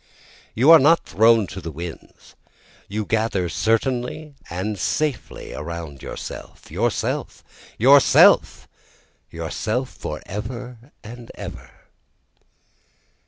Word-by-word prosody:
You 130 Hz, +8 st, +5 dB
are 165 Hz, -, +10 dB
not 160 Hz, +5 st, +4 dB
thrown 115 Hz, 0 st, +4 dB
to 95 Hz, 0 st, -8 dB
the 85 Hz, -, -6 dB
winds, 80 Hz, +2 st, -10 dB, 0.5 s
you 105 Hz, +1 st, -3 dB
gather 110 Hz, -5 st, 0 dB
certainly 125 Hz, -, -1 dB, 0.2 s
and 95 Hz, +4 st, -4 dB
safely 150 Hz, -5 st, -2 dB
around 75 Hz, -2 st, -7 dB
yourself, -, -, -9 dB
Yourself! -, -, -2 dB, 0.3 s
yourself!. 135 Hz, +4 st, +5 dB, 0.6 s
yourself, 110 Hz, +10 st, -3 dB
for -, -, -6 dB
ever 120 Hz, +4 st, -7 dB
and 120 Hz, +1 st, -11 dB
ever! -, -, -9 dB
110 Hz, 95 wpm, -22 LUFS, 95-125 Hz, 0.6 s, are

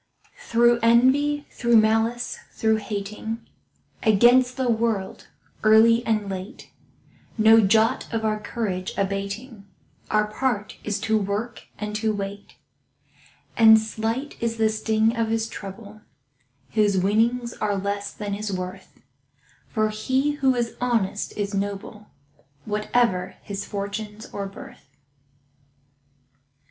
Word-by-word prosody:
Through 240 Hz, -, +3 dB
envy, 270 Hz, +6 st, +3 dB
through 235 Hz, -1 st, +3 dB
malice, 225 Hz, +2 st, +1 dB
through 220 Hz, -1 st, +1 dB
hating, 215 Hz, +2 st, -5 dB, 0.5 s
Against 245 Hz, +4 st, +4 dB
the 260 Hz, -1 st, 0 dB
world, 225 Hz, -4 st, -1 dB, 0.4 s
early 225 Hz, +2 st, +6 dB
and 215 Hz, -2 st, 0 dB
late, 190 Hz, +6 st, -7 dB, 0.7 s
No 220 Hz, +1 st, +7 dB
jot 220 Hz, +3 st, +2 dB
of 225 Hz, -1 st, -2 dB
our 215 Hz, 0 st, 0 dB
courage 200 Hz, -4 st, -4 dB
abating— 200 Hz, +3 st, -4 dB, 0.4 s
Our 215 Hz, 0 st, +2 dB
part 215 Hz, -1 st, -2 dB
is 210 Hz, -1 st, -2 dB
to 220 Hz, 0 st, +1 dB
work 210 Hz, +4 st, -4 dB
and 210 Hz, 0 st, -5 dB
to 215 Hz, 0 st, 0 dB
wait. 200 Hz, 0 st, -6 dB, 1.0 s
And 220 Hz, -1 st, +8 dB
slight 225 Hz, +5 st, -3 dB
is 230 Hz, -1 st, -1 dB
the 220 Hz, -1 st, +3 dB
sting 220 Hz, +1 st, +1 dB
of 230 Hz, -1 st, 0 dB
his 225 Hz, 0 st, -1 dB
trouble 205 Hz, +1 st, -9 dB, 0.7 s
Whose 210 Hz, -3 st, +2 dB
winnings 230 Hz, +5 st, +1 dB
are 205 Hz, -2 st, -1 dB
less 200 Hz, +1 st, -3 dB
than 205 Hz, -1 st, -5 dB
his 210 Hz, +1 st, -3 dB
worth; 185 Hz, 0 st, -7 dB, 0.7 s
For 215 Hz, -1 st, 0 dB
he 260 Hz, +7 st, 0 dB
who 270 Hz, -3 st, +1 dB
is 235 Hz, -1 st, -2 dB
honest 225 Hz, -5 st, 0 dB
is 205 Hz, 0 st, -2 dB
noble, 200 Hz, +1 st, -4 dB, 0.6 s
Whatever 210 Hz, -3 st, 0 dB
his 200 Hz, -1 st, -5 dB
fortunes 210 Hz, +1 st, -5 dB
or 200 Hz, -1 st, -3 dB
birth. 135 Hz, -7 st, -13 dB
220 Hz, 120 wpm, -24 LUFS, 200-230 Hz, 1.0 s, And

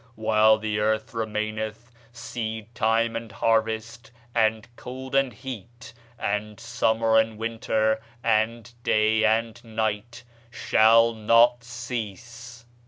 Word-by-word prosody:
While 110 Hz, 0 st, +4 dB
the 110 Hz, -1 st, -2 dB
earth 110 Hz, +2 st, 0 dB
remaineth, 110 Hz, +1 st, -4 dB, 0.2 s
seedtime 115 Hz, 0 st, -2 dB
and 115 Hz, -1 st, -5 dB
harvest, 110 Hz, +1 st, -1 dB, 0.2 s
and 110 Hz, -1 st, +1 dB
cold 130 Hz, +2 st, -8 dB
and 135 Hz, -2 st, +2 dB
heat, 120 Hz, 0 st, -9 dB, 0.2 s
and 105 Hz, 0 st, -3 dB
summer 115 Hz, -1 st, +2 dB
and 110 Hz, -1 st, 0 dB
winter, 110 Hz, -1 st, 0 dB, 0.2 s
and 115 Hz, +1 st, 0 dB
day 110 Hz, -2 st, +2 dB
and 115 Hz, +2 st, +1 dB
night 110 Hz, +1 st, -3 dB, 0.3 s
shall 115 Hz, 0 st, +4 dB
not 115 Hz, +2 st, +4 dB
cease." 120 Hz, 0 st, -7 dB
110 Hz, 105 wpm, -25 LUFS, 110-115 Hz, 0.3 s, While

